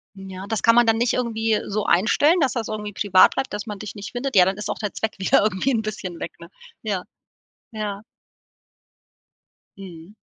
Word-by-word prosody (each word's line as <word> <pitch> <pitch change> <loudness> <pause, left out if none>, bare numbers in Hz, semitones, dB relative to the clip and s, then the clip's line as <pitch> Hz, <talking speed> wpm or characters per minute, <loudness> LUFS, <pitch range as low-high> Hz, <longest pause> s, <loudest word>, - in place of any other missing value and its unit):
Hm, 195 0 -10
ja, 190 0 -7
das 220 -2 -2
kann 230 - +5
man 240 0 +6
dann 225 0 +3
nicht 240 +1 +1
irgendwie 225 -3 0
so 210 +1 -2
einstellen, 290 - +3
dass 275 -5 +2
das 230 -3 -3
irgendwie 210 -1 -5
privat 190 -1 +5
bleibt, 270 -1 -3
dass 205 0 -4
man 210 -3 -7
dich 215 +1 -7
nicht 205 0 -8
findet? 250 0 -4
Ja, 180 -2 +7
dann 190 +1 -1
ist 210 - -5
auch - - -2
der 210 -2 -4
Zweck 220 -1 -3
wieder 190 - +3
irgendwie 215 +5 0
'n 225 - +1
bisschen 190 -5 -6
weg, 170 - -6
ne? 170 0 -12 0.3
Ja. 200 -4 -2 0.7
Ja. 210 -2 -4 1.8
Mhm. 180 -1 -11
210 Hz, 205 wpm, -22 LUFS, 195-225 Hz, 1.8 s, Ja